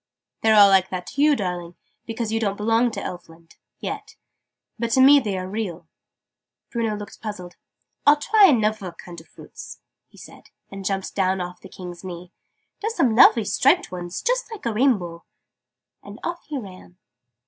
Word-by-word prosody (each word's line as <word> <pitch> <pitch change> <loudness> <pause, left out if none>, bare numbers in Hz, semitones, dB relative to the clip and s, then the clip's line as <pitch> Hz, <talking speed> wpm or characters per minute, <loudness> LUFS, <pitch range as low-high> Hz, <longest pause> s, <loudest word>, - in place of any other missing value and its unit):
"They're 220 -1 +4
all 205 -1 +8
like 190 -1 +4
that 180 -1 -5
to 280 - -4
you, 300 0 +5
darling, 180 -5 -4 0.3
because 225 -1 -3
you 225 - 0
don't 200 -3 -1
belong 225 +3 +2
to 220 -3 -6
Elfland 165 -2 -10 0.2
yet. - - -7 0.6
But 235 0 -1
to - - +3
me 280 +2 +8
they 210 -7 -3
are 185 0 -4
real." 190 -4 -5 0.8
Bruno 225 -3 -1
looked 205 0 -10
puzzled. 185 -5 -7 0.5
"I'll 290 +1 +6
try 420 +6 +5
anuvver 215 - 0
kind 175 -1 -11
of - - -22
fruits!" - - -12 0.3
he - - -22
said, - - -14 0.2
and 195 0 -8
jumped 195 0 -2
down 190 -1 0
off 180 0 -6
the 190 - -12
King's 180 -1 -10
knee. 180 -1 -8 0.5
"There's 445 +2 -2
some 240 - +2
lovely 230 -2 +6
striped - - +2
ones, 175 -1 -6
just - - -1
like 435 - -9
a 230 - 0
rainbow!" 200 -9 0 0.8
And - - -12
off 345 0 -5
he 300 - -4
ran. 185 -5 -11
205 Hz, 175 wpm, -23 LUFS, 180-235 Hz, 0.8 s, all